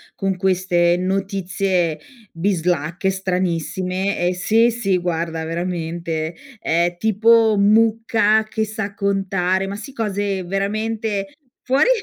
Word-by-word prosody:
con 195 -2 -1
queste 180 -2 +2
notizie 185 -3 -1 0.3
bislacche, 175 0 0
stranissime 185 0 -1
e 180 - +1
se 225 +6 +3
sì, 215 -5 0
guarda 165 -2 -2
veramente 165 -1 -3 0.2
è 170 +2 +1
tipo 220 +2 +4
mucca 220 +1 +3
che 220 0 -2
sa 215 -2 -5
contare, 195 -2 0
ma 200 - -4
si 225 +6 -8
cose 205 -5 -2
veramente 205 +3 -2 0.3
fuori 270 - +3
190 Hz, 105 wpm, -20 LUFS, 175-215 Hz, 0.3 s, tipo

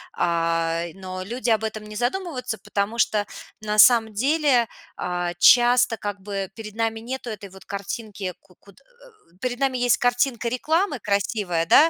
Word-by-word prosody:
Ай, 165 0 0
но 185 -1 -7
люди 235 +3 -3
об 220 -1 +2
этом 215 -1 -4
не 210 0 -9
задумываются, 250 - -2
потому 210 +4 -2
что 210 -1 +2 0.4
на 210 0 -1
самом 225 -3 +7
деле, 270 0 +2 0.3
а, 175 -1 -2
часто 245 -1 +6
как 205 -2 -5
бы 195 -1 -4
перед 215 -2 -9
нами 225 -1 -1
нету 250 +1 -6
этой 200 -2 -8
вот 190 +1 -15
картинки 200 -1 -5
ку 180 - -24
куд 200 +3 -19
э 445 - -23
перед 250 0 -2
нами 265 -2 +1
есть 245 -1 +3
картинка 245 0 +1
рекламы 310 - 0
красивая, 200 -4 0
да. 310 - +6
220 Hz, 160 wpm, -24 LUFS, 195-245 Hz, 0.4 s, самом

